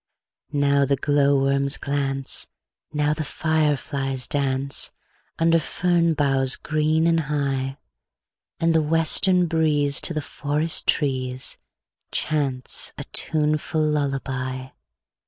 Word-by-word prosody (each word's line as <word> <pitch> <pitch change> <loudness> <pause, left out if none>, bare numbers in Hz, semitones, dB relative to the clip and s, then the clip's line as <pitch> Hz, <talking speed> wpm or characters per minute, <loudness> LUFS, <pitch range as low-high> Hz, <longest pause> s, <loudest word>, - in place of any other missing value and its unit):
Now 140 -1 +2
the 140 0 +1
glowworms 140 -1 +2
glance, 135 -1 -2 0.4
Now 150 -1 0
the 155 - -4
fireflies 145 -4 -1
dance, 140 -1 -1 0.5
Under 165 0 +3
fern 170 +1 0
boughs 135 -2 +3
green 155 +1 0
and 165 -1 +2
high; 140 -3 -2 0.8
And 165 0 +2
the 160 - +3
western 165 +4 +4
breeze 150 -4 +1
To 170 - 0
the - - 0
forest 150 +3 0
trees 130 -3 -1 0.5
Chants 135 -5 -1
a - - -5
tuneful 155 0 +1
lullaby. 135 -3 -3
145 Hz, 100 wpm, -23 LUFS, 135-155 Hz, 0.8 s, western